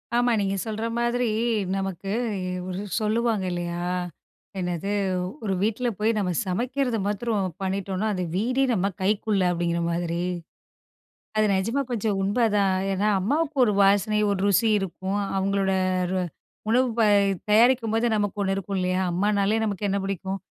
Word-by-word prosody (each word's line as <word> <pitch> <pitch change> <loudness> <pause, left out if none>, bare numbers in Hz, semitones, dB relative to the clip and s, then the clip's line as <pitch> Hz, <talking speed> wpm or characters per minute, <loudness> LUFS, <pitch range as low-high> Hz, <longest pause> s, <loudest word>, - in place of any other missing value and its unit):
ஆமா, 245 0 +3
நீங்க 195 0 0
சொல்ற 220 0 -3
மாதிரி 240 0 +1 0.5
நமக்கு 195 0 -3 0.6
ஒரு 185 +1 -4 0.2
சொல்லுவாங்க 220 -1 +1
இல்லையா? 175 0 -3 0.8
என்னது? 180 +2 -2 0.5
"ஒரு 200 - -1
வீட்ல 225 +4 0
போய் 215 +2 +2
நம்ம 190 -3 0 0.2
சமைக்கிறத 245 +5 -1
மாத்திரம் 205 -2 -1
பண்ணிட்டோம்ன்னா, 195 +2 -1
அந்த 185 -1 -2
வீடே 250 +8 +1
நம்ம 195 -4 +1 0.2
கைக்குள்ள." 200 0 +1
அப்படீங்கிற 170 0 -1
மாதிரி. 170 0 -1 1.2
அது 215 - +4
நெஜமா 225 +9 0
கொஞ்சம் 215 -3 0
உண்மைதான். 205 -2 +2 0.2
ஏன்னா, 200 +3 0
அம்மாவுக்கு 295 - 0
ஒரு 210 - +1
வாசனை, 205 +2 +3
ஒரு 200 - -1
ருசி 205 +4 +3
இருக்கும். 195 +2 -3 0.2
அவங்களோட 195 0 +1 0.4
ரு 190 - 0 0.5
உணவு 250 +3 +4
ப - - +5 0.5
தயாரிக்கும்போது, 230 0 +4
நமக்கு 205 -1 -1
ஒண்ணு 195 0 0
இருக்கும் 195 0 -3
இல்லையா? 185 0 0
அம்மானாலே 205 +3 +1
நமக்கு 205 -1 -2
என்ன 200 - +1
பிடிக்கும்? 195 0 -3
200 Hz, 135 wpm, -25 LUFS, 190-225 Hz, 1.2 s, ப